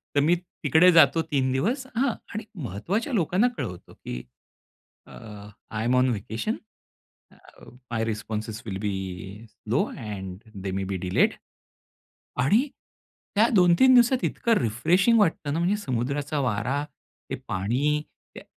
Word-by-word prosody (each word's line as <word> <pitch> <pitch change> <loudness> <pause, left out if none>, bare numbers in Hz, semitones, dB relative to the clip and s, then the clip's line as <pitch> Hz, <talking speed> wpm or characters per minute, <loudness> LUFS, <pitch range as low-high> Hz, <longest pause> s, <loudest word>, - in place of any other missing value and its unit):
तर 145 - +5
मी 170 +4 +4 0.3
तिकडे 160 +5 +6
जातो 165 -1 +6
3 130 -2 +1
दिवस 230 - 0
हां, 250 0 +2 0.2
आणि 215 +1 -4 0.2
महत्त्वाच्या 185 - -2
लोकांना 195 +3 +2
कळवतो 90 -1 -6
की - - -7 0.8
अ, - - -16 0.6
"I 110 +1 -2
am 125 +1 +2
on 130 0 +4
vacation. 115 - -2 1.4
My 115 -1 0
responses 110 0 -4
will 100 -4 -4
be 105 -2 -1 0.6
slow - - -1
and 95 -4 -6 0.2
they 95 - -2
may 95 - -1
be 95 - -1
delayed." 90 - +3 1.1
आणि 225 - +3 0.7
त्या 225 +3 +5
2-3 185 +8 +6
दिवसात 245 +1 +4
इतकं 235 - 0
रिफ्रेशिंग 175 - +3
वाटतं 160 -6 +1
ना, 160 - -1
म्हणजे 180 +4 +2
समुद्राचा 140 - -2
वारा, 130 +4 -1 0.5
ते - - -1
पाणी, 130 +11 0 0.3
त्या - - -9
145 Hz, 135 wpm, -26 LUFS, -, 1.4 s, तिकडे